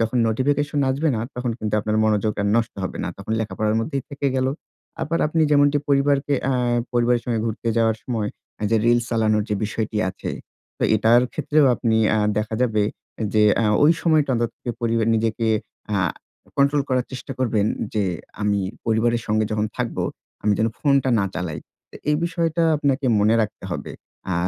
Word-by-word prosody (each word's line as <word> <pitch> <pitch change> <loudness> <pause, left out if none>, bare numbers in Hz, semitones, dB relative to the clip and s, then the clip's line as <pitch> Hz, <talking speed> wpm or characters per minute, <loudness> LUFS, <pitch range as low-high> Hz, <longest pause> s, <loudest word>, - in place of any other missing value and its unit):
যখন 115 +2 0
নোটিফিকেশন 145 +5 0
আসবে 145 +5 0
না - - -2
তখন 125 -1 -2
কিন্তু 105 -1 -2
আপনার 105 +1 -1
মনোযোগ 110 0 +1
আর - - 0
নষ্ট 115 -1 0
হবে - - -5
না। - - -2
তখন - - -5
লেখাপড়ার 110 0 -1
মধ্যেই 135 +3 -3
থেকে 140 0 -2
গেল। 130 - +1 0.6
আবার 165 +3 -1
আপনি 160 +1 +1
যেমনটি 145 0 +4
পরিবারকে 140 0 +2 0.2
আ - - +2 0.4
পরিবারের 120 0 +2
সঙ্গে 115 -3 -1
ঘুরতে 115 +1 -3
যাওয়ার 115 -1 +3 0.7
যে 115 - +4
রিলস 120 0 +3
চালানোর 110 -2 +2
যে 105 - 0
বিষয়টি 110 +1 -3
আছে। 95 - -6 0.5
তো - - -4
এটার 115 +3 +5
ক্ষেত্রেও 150 -1 +2
আপনি 115 -2 +1 0.4
দেখা 105 +1 -2
যাবে 110 -4 +2 0.5
যে 105 - +5 0.4
ওই 155 - +7
সময়টা 155 -5 +3 0.5
পরিবার 115 -1 +1
নিজেকে 115 0 0 0.5
আ - - +2 0.6
কন্ট্রোল 140 +1 +3
করার 130 -2 +1
চেষ্টা 130 - -6
করবেন 110 -5 +1 0.3
যে 105 -2 +1 0.4
আমি 105 -1 +1 0.3
পরিবারের 115 +1 +1
সঙ্গে 110 0 +1
যখন 105 0 0
থাকবো, 125 -2 -2 0.4
আমি 105 - +3
যেন 110 - +2
ফোনটা 140 -3 +2
না 100 - +1
চালাই। 80 -4 -3 0.3
তো - - -17 0.2
এই 150 - +3
বিষয়টা 165 -1 0
আপনাকে 140 -2 0
মনে 110 +2 +4
রাখতে 105 -2 -3
হবে। 85 - -5 0.4
আ - - +1
115 Hz, 165 wpm, -22 LUFS, 110-140 Hz, 0.7 s, ওই